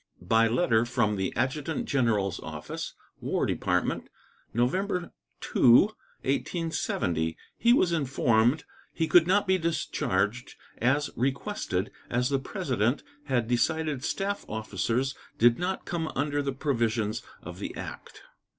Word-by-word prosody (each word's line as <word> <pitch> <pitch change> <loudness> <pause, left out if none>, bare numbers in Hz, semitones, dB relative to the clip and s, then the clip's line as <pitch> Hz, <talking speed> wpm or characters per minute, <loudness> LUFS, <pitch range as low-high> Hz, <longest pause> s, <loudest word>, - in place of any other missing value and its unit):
By 115 +5 +4
letter 115 -2 +3
from 120 -3 +1
the 95 -1 -1
Adjutant 150 +4 -1
General's 110 -8 +1
Office, 75 -1 -6 0.2
War - - 0
Department, - - 0 0.4
November 180 - 0 0.3
2, - - -4 0.6
1870, 130 - -1 0.2
he 235 - +3
was 185 -8 +4
informed 130 -3 +2 0.3
he 160 - -1
could 170 0 +6
not 200 +3 +3
be 190 -1 +2
discharged 125 - -1 0.2
as 140 +5 +2
requested, 130 - -1 0.2
as 125 +1 +1
the 135 -1 +1
President 130 - -1 0.2
had 125 -5 0
decided 150 +3 0
staff 200 +5 -2
officers 115 +4 -1 0.2
did 120 +1 +5
not 185 +2 -2
come 165 -2 -2
under 145 0 0
the 140 -1 -1
provisions 115 -6 0 0.2
of - - -8
the - - -5
act. - - -8
130 Hz, 125 wpm, -28 LUFS, 115-160 Hz, 0.6 s, could